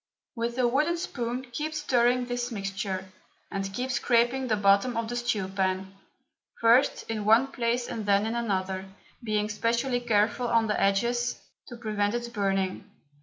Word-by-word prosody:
With 235 +1 -2
a 250 -1 +3
wooden 300 +8 +1
spoon 250 -5 -3
keep 305 +5 -3
stirring 250 -4 +2
this 245 0 -3
mixture, 195 -2 -4 0.4
and 195 0 -3
keep 250 +6 -3
scraping 245 +2 +2
the 220 - +2
bottom 200 +4 +3
of 230 -1 -1
the 240 - -4
stew 240 -5 -1
pan, 190 0 -1 0.7
first 235 +4 +4
in 220 -2 -3
one 230 +6 +4
place 240 -1 -1
and 215 -2 -5
then 200 +1 +3
in 225 - -2
another, 190 -5 -2 0.4
being 210 -2 0
specially 235 +4 0
careful 225 +1 +1
of 230 -1 +2
the 210 - 0
edges, 240 +5 +1 0.3
to 240 - -9
prevent 210 -1 -1
its 240 0 -3
burning. 195 -3 -1
230 Hz, 160 wpm, -27 LUFS, 200-245 Hz, 0.7 s, first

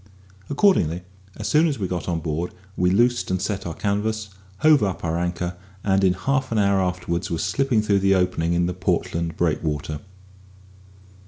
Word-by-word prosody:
Accordingly, 115 - +2 0.3
as - - -4
soon 155 +2 +4
as 145 - -1
we 100 -4 -2
got 90 -1 -3
on 85 -2 -1
board, 80 +3 -3 0.2
we 90 0 +2
loosed 120 +6 +2
and 95 - 0
set 100 -1 -3
our 80 - -5
canvas, 105 +1 -1 0.3
hove 155 -2 +6
up 95 -4 -1
our 80 +1 0
anchor, 90 0 -2 0.3
and 95 -1 +2
in 95 -1 +4
half 130 +7 -1
an 115 - 0
hour 100 -2 +3
afterwards 90 -1 -2
were 85 - -1
slipping 130 +2 +1
through 100 -2 +2
the 95 0 +3
opening 90 -2 +1
in 85 0 +2
the 90 - -1
Portland 85 -2 -1
Breakwater. 75 -2 -1
95 Hz, 175 wpm, -23 LUFS, 85-105 Hz, 0.3 s, hove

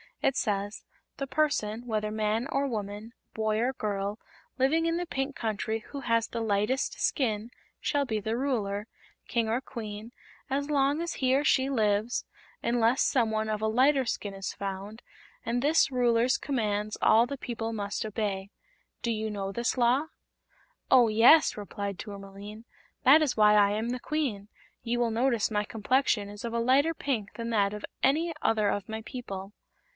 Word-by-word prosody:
It 270 - +2
says: 205 -3 -2 0.3
'The 275 - -3
person, 245 -7 0
whether 215 -2 -1
man 215 +3 0
or 275 0 +1
woman, 210 -1 -5 0.2
boy 220 0 0
or 250 +3 +1
girl, 205 -2 -3 0.4
living 295 +5 +2
in 330 0 +1
the 355 - -2
Pink 270 0 -3
Country 220 0 -2
who 280 - -6
has 230 -2 +1
the 230 - -4
lightest 215 +5 0
skin, 225 -5 0 0.3
shall 285 -1 0
be 220 -4 -1
the 220 +3 -2
Ruler 215 -6 -1 0.4
King 230 -2 0
or 230 +4 0
Queen 220 -3 -7 0.4
as 280 +2 -1
long 285 +2 +2
as 340 -1 -2
he 260 0 +2
or 280 - +2
she 270 -2 +3
lives, 215 -2 +1 0.4
unless 235 +1 +2
some 240 -5 +2
one 220 0 -1
of 215 -1 -2
a 220 - +1
lighter 260 +4 +3
skin 205 -3 -3
is 195 0 -4
found, 200 +3 -6 0.4
and 240 +1 0
this 295 0 +3
Ruler's 245 0 +3
commands 215 -6 -2
all 230 +2 +5
the 280 - -5
people 230 -3 -4
must 205 0 -3
obey.' 200 -3 -3 0.5
Do 235 - 0
you 220 -1 -2
know 195 -2 -3
this 235 +5 -1
Law?" 250 +5 +3 0.8
"Oh, 245 -3 +6
yes," 235 +9 +6
replied 200 -1 -5
Tourmaline. 200 +2 -9 0.4
"That 290 +5 +7
is 295 -6 0
why 210 0 +6
I 205 -1 +5
am 220 +3 -1
the 250 +1 -2
Queen. 245 -10 -2 0.3
You 240 +1 -1
will 235 -1 +1
notice 235 -1 +1
my 210 -1 +1
complexion 220 0 +1
is 205 0 -9
of 235 -1 -4
a 235 - 0
lighter 275 +7 +3
pink 240 -9 -2
than 230 0 -4
that 205 -2 +2
of 210 - -5 0.2
any 320 +5 +2
other 215 -2 +2
of 205 0 -3
my 220 0 -4
people." 200 -5 -7
225 Hz, 175 wpm, -28 LUFS, 210-260 Hz, 0.8 s, That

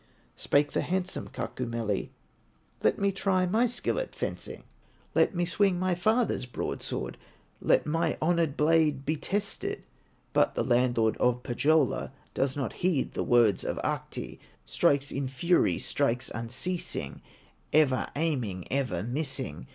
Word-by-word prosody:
Spake 145 +1 +2
the - - 0
handsome 185 0 -2
Kaukomieli: 115 -5 -3 0.7
"Let - - +3
me 200 0 +2
try 190 -1 +1
my 220 +7 +3
skill 245 - -1
at - - -5
fencing, - - -5 0.5
Let - - +3
me 175 0 +1
swing 190 +1 +2
my 185 0 +1
father's 215 - +1
broadsword, 120 - -4 0.4
Let - - +3
my 165 +2 0
honored 165 -3 +1
blade 150 -3 +3
be 155 - +1
tested!" 200 +6 -2 0.5
But - - +3
the - - +1
landlord 120 -2 +2
of 125 0 +1
Pohyola, 145 +2 +1 0.2
Does 135 +1 0
not 130 -6 -2
heed 175 -7 +1
the - - -1
words 115 -5 +4
of - - -2
Ahti, - - -4 0.3
Strikes 140 0 +2
in 135 -1 -2
fury, 170 +7 +2
strikes 130 -3 0
unceasing, 130 +11 -3 0.5
Ever 145 -4 +3
aiming, 125 - -1
ever 125 -10 0
missing. 130 - -3
145 Hz, 135 wpm, -28 LUFS, 125-175 Hz, 0.7 s, words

